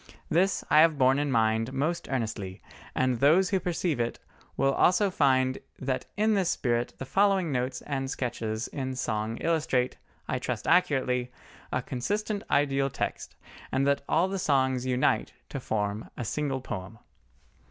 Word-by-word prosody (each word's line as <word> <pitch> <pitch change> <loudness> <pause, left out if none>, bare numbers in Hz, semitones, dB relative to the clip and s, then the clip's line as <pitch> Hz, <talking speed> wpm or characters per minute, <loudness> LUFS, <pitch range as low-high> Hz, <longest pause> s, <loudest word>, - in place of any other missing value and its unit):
This 185 +4 +2
I 155 - +7
have 160 -1 +5
borne 130 +1 +4
in 145 0 0
mind 115 +1 +1
most 160 +6 -1
earnestly, 110 -7 -3 0.4
and 130 -2 +1
those 170 +7 +4
who 190 - +2
perceive 175 -5 -1
it 120 0 -1 0.4
will 135 0 +3
also 185 +6 +3
find 130 -4 +2 0.2
that 130 -1 -2
in 215 +1 +3
this 195 -4 +2
spirit 120 -1 0
the 135 - -6
following 195 0 +2
notes 125 0 -2
and 135 -2 -3
sketches 115 -3 -3
in 130 -2 -4
song 110 -2 -2
illustrate, 155 -6 +1 0.3
I 125 - -1
trust 125 -3 -3
accurately, 125 -7 +2 0.4
a - - -1
consistent 205 - -2
ideal 140 -1 +2
text, - - -4 0.4
and 135 - +1
that 140 0 +2
all 170 +4 +3
the 195 0 -3
songs 130 -5 +1
unite 125 0 +1 0.2
to - - -4
form 105 0 -2
a 120 - -3
single 135 +2 -2
poem. 105 -2 -6
135 Hz, 155 wpm, -28 LUFS, 125-160 Hz, 0.4 s, I